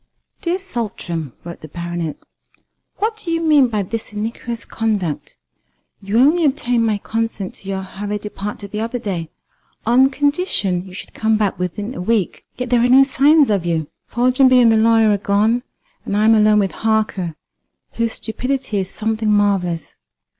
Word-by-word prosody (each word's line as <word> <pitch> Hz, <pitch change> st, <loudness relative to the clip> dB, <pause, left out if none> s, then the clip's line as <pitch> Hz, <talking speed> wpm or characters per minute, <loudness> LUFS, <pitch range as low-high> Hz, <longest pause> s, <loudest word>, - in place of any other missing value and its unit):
"DEAR 345 Hz, +1 st, 0 dB
SALTRAM" 200 Hz, -, -4 dB
(wrote 170 Hz, 0 st, -9 dB
the 155 Hz, -, -9 dB
Baronet), 170 Hz, -1 st, -4 dB, 0.8 s
"What 440 Hz, +1 st, -1 dB
do 430 Hz, -5 st, -6 dB
you 330 Hz, 0 st, +1 dB
mean 305 Hz, -5 st, +4 dB
by 215 Hz, -4 st, -1 dB
this 220 Hz, +4 st, -5 dB
iniquitous 230 Hz, +2 st, -4 dB
conduct? 205 Hz, -9 st, -2 dB, 0.6 s
You 200 Hz, +3 st, -1 dB
only 305 Hz, +8 st, +4 dB
obtained 245 Hz, -5 st, +1 dB
my 215 Hz, -2 st, +1 dB
consent 220 Hz, -2 st, -3 dB
to 195 Hz, -, -9 dB
your 190 Hz, -1 st, -2 dB
hurried 205 Hz, +2 st, -5 dB
departure 205 Hz, 0 st, -6 dB
the 210 Hz, +1 st, -5 dB
other 230 Hz, +3 st, -2 dB
day 180 Hz, -8 st, -4 dB, 0.6 s
on 255 Hz, +4 st, +5 dB
condition 280 Hz, -, 0 dB
you 185 Hz, -, -12 dB
should -, -, -9 dB
come 220 Hz, 0 st, +1 dB
back 205 Hz, -4 st, -1 dB
in 205 Hz, +6 st, -3 dB
a -, -, -6 dB
week, 210 Hz, -1 st, -1 dB
yet 250 Hz, -1 st, -4 dB
there 245 Hz, -, +4 dB
are 245 Hz, -, +3 dB
no 265 Hz, +2 st, +8 dB
signs 280 Hz, 0 st, +4 dB
of 195 Hz, -4 st, +1 dB
you. 165 Hz, -3 st, -1 dB, 0.2 s
Foljambe 255 Hz, +2 st, +3 dB
and 235 Hz, -2 st, +6 dB
the -, -, +4 dB
lawyer 225 Hz, 0 st, +4 dB
are 205 Hz, -, +2 dB
gone, 215 Hz, +4 st, +2 dB, 0.4 s
and 200 Hz, -, -2 dB
I 210 Hz, -, +3 dB
am 225 Hz, -, +6 dB
alone 215 Hz, -1 st, +5 dB
with 195 Hz, -2 st, +2 dB
Harker, 215 Hz, -6 st, -1 dB, 0.6 s
whose 230 Hz, -1 st, -1 dB
stupidity 250 Hz, -1 st, -3 dB
is 190 Hz, -1 st, -3 dB
something 220 Hz, 0 st, -2 dB
marvellous. 195 Hz, -5 st, 0 dB
220 Hz, 170 wpm, -19 LUFS, 195-245 Hz, 0.8 s, no